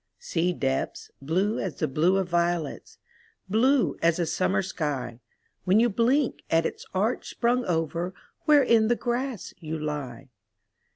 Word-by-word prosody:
Sea 180 - -1
depths, 135 -6 -2
blue 185 +10 0
as 180 -7 -3
the - - 0
blue 165 +8 +2
of 190 -2 0
violets 170 -3 -1 0.2
— - - -35
Blue 255 +5 +3
as 165 0 +3
a 175 - 0
summer 190 +4 0
sky, 145 -10 -3 0.4
When 190 +3 +4
you 240 +1 +4
blink 245 +6 +1
at 165 0 +3
its - - -5
arch 210 +6 -1
sprung 245 +1 +1
over 170 +2 -1 0.3
Where 295 -3 +6
in 230 -3 +4
the 240 - +3
grass 245 -2 -3
you 160 -1 -4
lie. 140 -4 -5
180 Hz, 155 wpm, -26 LUFS, 160-230 Hz, 0.4 s, Where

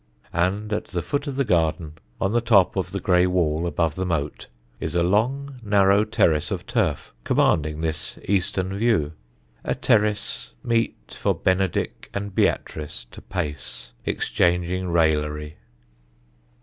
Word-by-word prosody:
And 100 +5 0
at 105 - -1
the 90 -3 -3
foot 145 +1 -2
of 140 - -3
the 140 - +2
garden, 80 -4 +1 0.3
on 95 - +1
the 120 +1 +2
top 110 -6 +4
of 95 -2 -1
the 100 - -2
grey 90 -2 +3
wall 85 -2 +1
above 80 -2 0
the 95 - -3
moat, 80 -5 -2 0.3
is 80 0 -3
a 85 - +3
long, 130 +9 0
narrow 100 -1 +4
terrace 80 -8 +2
of - - -4
turf, - - -1
commanding 75 +3 +2
this 80 -1 -2
eastern 95 -1 0
view 100 -9 +2 0.5
a - - -1
terrace 105 - +1
meet 115 -1 -1
for - - +2
Benedick 95 -1 0
and 100 -1 -3
Beatrice 75 -8 -1
to - - -11
pace, 65 -9 -5
exchanging 90 +1 0
raillery. 75 -2 +1
90 Hz, 140 wpm, -24 LUFS, 80-105 Hz, 0.5 s, top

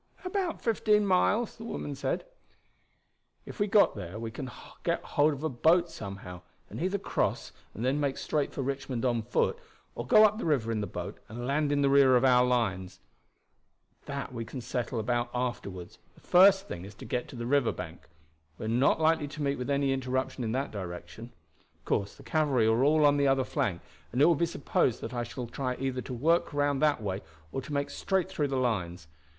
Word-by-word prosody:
"About 365 -2 -2
fifteen 210 -2 +3
miles," 200 +4 +2
the 225 - -9
woman 150 -10 -4
said. 140 - -2 1.2
"If - - -10
we 205 - +2
got 205 0 +4
there 90 +4 -6
we 115 0 -5
can 130 +2 -6 0.3
get - - -1
hold 150 +2 +2
of 145 0 -6
a - - +2
boat 165 +7 +3
somehow, 95 -3 -8 0.3
and - - -6
either 190 +3 0
cross 195 - -1 0.2
and 115 - -3
then 135 +3 +1
make 140 -2 -1
straight 150 -2 -1
for 135 - -3
Richmond 135 -2 -3
on 120 -2 +1
foot, 110 - 0 0.3
or - - -6
go 215 - +7
up 215 +1 +2
the - - -3
river 130 -8 +1
in 110 -2 -1
the 105 - -3
boat 90 +3 -6
and 120 +3 -6
land 145 +2 +1
in 145 0 +2
the - - +4
rear 135 -2 +6
of 125 - +4
our 125 -1 +6
lines. 95 -7 -1 1.1
That 140 -2 -5
we 115 -1 -4
can 115 +4 -7
settle 120 0 -3
about 120 +2 0
afterward. 100 -8 -4 0.2
The - - -20
first 195 +2 +6
thing 85 - -6
is 100 +2 -10
to - - -10
get 125 - -2
to - - -11
the 120 -1 -5
river 140 -1 +2
bank. - - -8 0.5
We - - -6
are - - -2
not 125 +7 +3
likely 160 -1 +2
to 145 +1 -6
meet 140 -1 0
with 125 - -4
any 140 -1 +2
interruption 130 0 -2
in 110 - -1
that 135 +2 -2
direction. 100 +4 -7 0.5
Of - - -37
course 100 0 -1
the - - -15
cavalry 145 -8 +2
are 110 +3 +3
all 150 +1 +4
on 145 0 +5
the 140 -1 +3
other 135 -1 +3
flank, 125 - -2 0.3
and 125 - -2
it 145 - +7
will 170 - +6
be 170 +2 +1
supposed 140 -6 0
that 115 - -6
I 120 - -1
shall 120 +1 -5
try 125 +2 -3
either 130 -1 -2
to - - -8
work 165 +8 +2
round 145 -1 +1
that 150 -7 +2
way 95 -2 -2 0.3
or 135 - -3
to 150 - -10
make 140 0 -1
straight 190 -3 -1
through 145 - -1
the 135 -1 -2
lines. 90 -9 -1
130 Hz, 215 wpm, -29 LUFS, 115-150 Hz, 1.2 s, go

